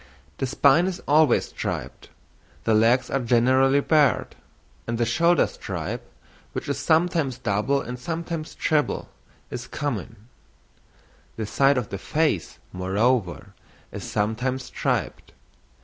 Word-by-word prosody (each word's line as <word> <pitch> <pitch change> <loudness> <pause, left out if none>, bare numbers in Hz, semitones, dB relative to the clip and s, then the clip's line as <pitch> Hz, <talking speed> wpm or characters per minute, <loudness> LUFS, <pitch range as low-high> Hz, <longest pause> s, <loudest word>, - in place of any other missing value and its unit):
The 135 - 0
spine 140 +6 +4
is 190 -1 -3
always 155 +1 +4
striped; - - -5 0.5
the 115 - +2
legs 115 +4 +3
are 135 - +1
generally 130 +3 +3
barred; 150 -3 +2 0.5
and 115 0 -2
the 120 - +1
shoulder 170 +9 +3
stripe, - - -5 0.5
which - - -5
is 140 -1 -2
sometimes 160 -3 +1
double 115 +7 0
and 125 +1 -6
sometimes 165 +2 -5
treble, 150 -2 0 0.4
is - - -6
common; 115 -6 -5 1.1
the 110 - -3
side 135 +5 +3
of 120 -4 -2
the 100 - -5
face, 150 - -1 0.2
moreover, 100 +1 0 0.4
is - - -7
sometimes 125 +5 -1
striped. - - -3
130 Hz, 120 wpm, -24 LUFS, 115-150 Hz, 1.1 s, spine